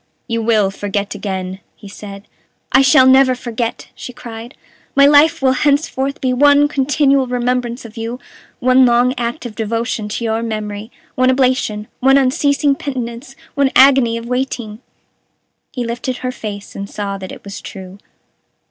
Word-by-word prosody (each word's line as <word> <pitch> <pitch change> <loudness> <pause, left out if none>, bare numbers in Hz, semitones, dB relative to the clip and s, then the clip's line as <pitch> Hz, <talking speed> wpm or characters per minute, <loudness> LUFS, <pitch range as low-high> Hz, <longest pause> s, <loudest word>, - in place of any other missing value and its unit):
"You 230 -2 -1
will 215 -3 +2
forget 200 0 -3
again," 190 -2 -5 0.2
he 205 - -13
said. 200 0 -10 0.4
"I 270 - +6
shall 260 -1 +5
never 260 0 +5
forget!" 235 -1 -4
she - - -9
cried. 235 0 -10 0.4
"My 280 0 +6
life 295 +2 +5
will 260 - +4
henceforth 280 0 0
be 255 -1 +1
one 285 +2 +5
continual 275 -1 +1
remembrance 245 0 -2
of 225 -1 -12
you, 230 +2 -5 0.4
one 255 +1 +4
long 245 +1 +3
act 240 +4 -4
of 235 - -6
devotion 225 0 -3
to 225 +3 -4
your 225 0 -1
memory, 215 -1 -5 0.2
one 255 0 +2
oblation, 255 -5 0
one 270 +2 +4
unceasing 280 +2 +2
penitence, 255 -1 -6 0.2
one 280 -2 +2
agony 260 -3 +5
of 230 - -7
waiting!" 245 -3 -3 0.9
He 245 -2 -4
lifted 240 +2 -4
her 255 +1 -3
face, 205 -5 -8
and 200 0 -6
saw 200 -1 -4
that 185 -1 -8
it - - -11
was 200 0 -8
true. 190 0 -10
245 Hz, 155 wpm, -17 LUFS, 215-265 Hz, 0.9 s, I